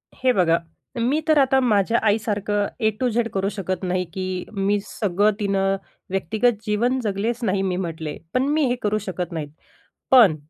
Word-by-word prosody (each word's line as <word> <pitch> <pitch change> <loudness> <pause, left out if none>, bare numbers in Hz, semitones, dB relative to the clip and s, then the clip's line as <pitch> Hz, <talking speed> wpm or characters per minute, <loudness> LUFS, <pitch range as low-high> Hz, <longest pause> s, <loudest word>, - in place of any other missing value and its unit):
हे 255 0 +2
बघा 170 -5 +3 0.4
मी 255 +6 +2
तर 310 -1 +4
आता 265 -1 +4
माझ्या 225 -1 +2
आईसारखं 205 -1 0
ए 220 -2 +3
टू 255 - +2
झेड 235 0 0
करू 195 0 0
शकत 190 -2 -4
नाही, 185 0 0
की 185 +1 -4
मी 200 0 +1
सगळं 205 0 +1
तिनं 195 -1 +1 0.3
व्यक्तिगत 210 +6 +1
जीवन 235 +5 +1
जगलेच 215 +3 -1
नाही 195 -2 +1
मी 190 -2 0
म्हटले. 165 -4 -4 0.2
पण 255 - +2
मी 310 -1 +3
हे 245 - +1
करू 210 0 +1
शकत 180 -1 -3
नाही. 155 -3 -3 0.6
पण, 230 -11 +7
205 Hz, 170 wpm, -23 LUFS, 185-230 Hz, 0.6 s, पण